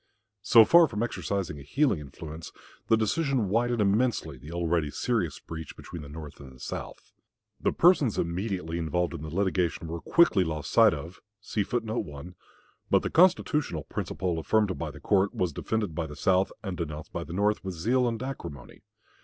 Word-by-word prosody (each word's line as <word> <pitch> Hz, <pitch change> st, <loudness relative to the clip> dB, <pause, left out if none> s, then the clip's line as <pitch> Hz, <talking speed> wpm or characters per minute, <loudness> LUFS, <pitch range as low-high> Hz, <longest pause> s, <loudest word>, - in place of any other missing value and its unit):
So 110 Hz, +2 st, +7 dB
far 170 Hz, +4 st, +7 dB
from 105 Hz, -4 st, -2 dB
exercising 100 Hz, -9 st, -3 dB
a -, -, -10 dB
healing 130 Hz, -, +1 dB
influence, 75 Hz, +2 st, -9 dB, 0.4 s
the 110 Hz, -, +4 dB
decision 125 Hz, -, 0 dB
widened 120 Hz, +2 st, +1 dB
immensely 100 Hz, -, +1 dB
the 70 Hz, +5 st, -11 dB
already 85 Hz, -2 st, 0 dB
serious 100 Hz, -, -1 dB
breach 80 Hz, -2 st, -8 dB
between 85 Hz, -, -8 dB
the 70 Hz, -, -10 dB
North 75 Hz, -1 st, -9 dB
and 70 Hz, -2 st, -11 dB
the 65 Hz, -, -16 dB
South. -, -, -7 dB, 0.5 s
The -, -, +1 dB
persons 160 Hz, -, +4 dB
immediately 85 Hz, -1 st, -2 dB
involved 85 Hz, +2 st, -1 dB
in -, -, -6 dB
the 80 Hz, -, -6 dB
litigation 90 Hz, -1 st, 0 dB
were 85 Hz, +1 st, -5 dB
quickly 170 Hz, -, +4 dB
lost 80 Hz, -3 st, -4 dB
sight -, -, +6 dB
of; 85 Hz, +3 st, -9 dB, 0.3 s
but 100 Hz, -7 st, -3 dB
the -, -, -2 dB
constitutional 155 Hz, -, +3 dB
principle 90 Hz, +2 st, -3 dB
affirmed 105 Hz, +2 st, +1 dB
by -, -, -3 dB
the -, -, -11 dB
court 100 Hz, 0 st, +1 dB
was 90 Hz, -4 st, 0 dB
defended 105 Hz, +1 st, -2 dB
by 80 Hz, 0 st, -3 dB
the 75 Hz, -, -9 dB
South 95 Hz, +6 st, +2 dB
and 95 Hz, -2 st, -4 dB
denounced 75 Hz, -2 st, -6 dB
by -, -, -3 dB
the -, -, -8 dB
North 105 Hz, +3 st, +1 dB
with 95 Hz, -2 st, -5 dB
zeal 125 Hz, +9 st, +2 dB
and 115 Hz, +1 st, -2 dB
acrimony. 85 Hz, -, -7 dB
90 Hz, 170 wpm, -28 LUFS, 80-110 Hz, 0.5 s, So